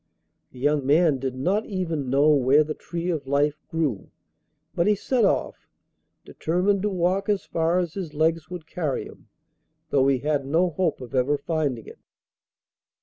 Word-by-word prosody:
The -, -, -15 dB
young 145 Hz, +2 st, +1 dB
man 150 Hz, +1 st, +3 dB
did 130 Hz, -1 st, -3 dB
not 185 Hz, +11 st, 0 dB
even 165 Hz, -9 st, -3 dB
know 140 Hz, +4 st, +4 dB
where 140 Hz, +1 st, +4 dB
the 155 Hz, 0 st, -4 dB
tree 170 Hz, +3 st, -4 dB
of 150 Hz, -5 st, -4 dB
life 145 Hz, +2 st, +1 dB
grew, 150 Hz, -, -2 dB, 0.6 s
but 170 Hz, -, +1 dB
he 210 Hz, -, +4 dB
set 240 Hz, +4 st, 0 dB
off, -, -, -1 dB, 0.6 s
determined 185 Hz, +4 st, 0 dB
to 210 Hz, -, 0 dB
walk 185 Hz, +2 st, 0 dB
as 205 Hz, -2 st, 0 dB
far 165 Hz, +1 st, 0 dB
as 175 Hz, -3 st, -1 dB
his 170 Hz, -6 st, -6 dB
legs 160 Hz, 0 st, +1 dB
would 180 Hz, -3 st, -7 dB
carry 155 Hz, -5 st, -3 dB
him, -, -, -14 dB, 0.6 s
though 135 Hz, -1 st, +3 dB
he 135 Hz, -1 st, +3 dB
had 145 Hz, +2 st, -1 dB
no 165 Hz, +6 st, +1 dB
hope 160 Hz, -3 st, -1 dB
of 125 Hz, -, -9 dB
ever 135 Hz, +3 st, +2 dB
finding 140 Hz, -6 st, -2 dB
it. -, -, -13 dB
155 Hz, 170 wpm, -24 LUFS, 140-180 Hz, 0.6 s, know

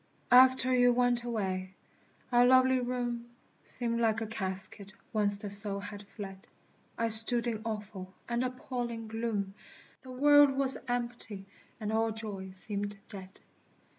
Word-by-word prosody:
After 255 Hz, +1 st, +6 dB
you 245 Hz, -1 st, +5 dB
went 245 Hz, -1 st, +2 dB
away, 190 Hz, -5 st, -3 dB, 0.6 s
our 245 Hz, 0 st, +5 dB
lovely 260 Hz, +1 st, +5 dB
room 245 Hz, -1 st, -3 dB, 0.3 s
Seemed 235 Hz, -1 st, -3 dB
like 225 Hz, -1 st, +1 dB
a 225 Hz, -, -3 dB
casket 195 Hz, -1 st, -5 dB, 0.2 s
whence 205 Hz, -2 st, +2 dB
the 205 Hz, 0 st, -7 dB
soul 200 Hz, 0 st, 0 dB
had 205 Hz, 0 st, -9 dB
fled. 195 Hz, -3 st, -10 dB, 0.5 s
I 230 Hz, -, 0 dB
stood 225 Hz, +2 st, +5 dB
in 225 Hz, -3 st, -3 dB
awful 210 Hz, -4 st, -6 dB, 0.2 s
and 235 Hz, +1 st, -1 dB
appalling 245 Hz, -3 st, -5 dB
gloom, 220 Hz, -3 st, -3 dB, 0.5 s
The 260 Hz, -, -14 dB
world 290 Hz, +2 st, +5 dB
was 270 Hz, -1 st, +4 dB
empty 240 Hz, -5 st, -1 dB, 0.3 s
and 215 Hz, -1 st, -3 dB
all 225 Hz, +1 st, +1 dB
joy 210 Hz, -4 st, -6 dB
seemed 205 Hz, +2 st, -2 dB
dead. 190 Hz, -1 st, -11 dB
225 Hz, 135 wpm, -30 LUFS, 205-245 Hz, 0.6 s, After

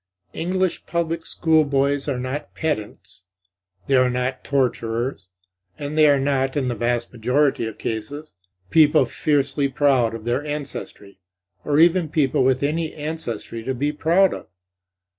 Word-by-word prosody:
English 185 Hz, +2 st, -1 dB
public 165 Hz, -1 st, -2 dB
school 160 Hz, -2 st, +3 dB
boys 140 Hz, 0 st, 0 dB
are 140 Hz, -3 st, -1 dB
not 130 Hz, +4 st, -5 dB
pedants, 105 Hz, -, -3 dB, 0.6 s
they -, -, -1 dB
are 130 Hz, -1 st, +5 dB
not 125 Hz, +1 st, -2 dB
torturers; 120 Hz, -5 st, -1 dB, 0.5 s
and 145 Hz, +1 st, -5 dB
they 155 Hz, -1 st, +6 dB
are 140 Hz, -1 st, +4 dB
not, 135 Hz, 0 st, 0 dB
in 130 Hz, -3 st, 0 dB
the -, -, -1 dB
vast 120 Hz, +1 st, -1 dB
majority 125 Hz, +1 st, +1 dB
of 110 Hz, -, -8 dB
cases, 140 Hz, +8 st, -5 dB, 0.4 s
people 155 Hz, -1 st, +5 dB
fiercely 140 Hz, -1 st, 0 dB
proud 130 Hz, -4 st, +2 dB
of 115 Hz, -1 st, -9 dB
their 120 Hz, +4 st, 0 dB
ancestry, 140 Hz, -9 st, -7 dB, 0.4 s
or 145 Hz, 0 st, +1 dB
even 170 Hz, 0 st, +4 dB
people 140 Hz, -4 st, +2 dB
with 130 Hz, +1 st, +2 dB
any 155 Hz, +2 st, -1 dB
ancestry 145 Hz, -7 st, -4 dB
to 130 Hz, +2 st, -2 dB
be 145 Hz, +4 st, 0 dB
proud 170 Hz, +5 st, +3 dB
of. -, -, -8 dB
140 Hz, 145 wpm, -22 LUFS, 125-150 Hz, 0.6 s, they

